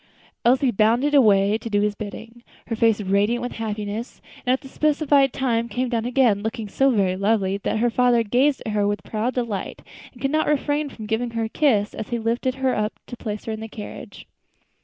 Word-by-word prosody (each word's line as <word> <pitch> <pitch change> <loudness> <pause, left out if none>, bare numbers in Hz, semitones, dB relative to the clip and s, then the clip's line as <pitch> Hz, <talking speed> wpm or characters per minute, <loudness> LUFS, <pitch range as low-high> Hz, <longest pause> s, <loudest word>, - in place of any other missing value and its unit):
Elsie 255 +1 +3
bounded 235 +7 +2
away 210 -5 +4
to 230 - -6
do 205 -1 +1
his 210 0 +1
bidding, 220 +3 -9 0.2
her 225 - -3
face 225 -1 +3
radiant 205 +4 +1
with 245 - -3
happiness; 215 +1 -5 0.3
and - - +4
at 260 - +1
the - - -11
specified 285 -1 +2
time 235 -3 -1
came 250 +3 -2
down 230 -2 -1
again, 245 -5 +2
looking 220 0 -4
so 270 +7 +2
very 195 -7 +2
lovely 195 -1 +1
that 200 - -2
her 240 +2 +1
father 245 -1 +3
gazed 255 +6 +1
at 220 - -2
her 205 -1 +1
with 205 0 -2
proud 225 +4 -2
delight, 235 -6 -3 0.3
and 245 - -18
could 275 +2 -1
not 310 +1 +1
refrain 295 0 0
from 220 -5 -9
giving 225 +3 -1
her 225 - 0
a 220 - -3
kiss 220 -8 +2
as 220 - -6
he 240 - -1
lifted 235 +3 -1
her 265 -1 0
up 210 +1 -1
to 245 - -8
place 215 -3 -6
her 225 - -3
in 220 - -4
the 220 - -6
carriage. 210 -1 -9
230 Hz, 215 wpm, -23 LUFS, 210-255 Hz, 0.3 s, away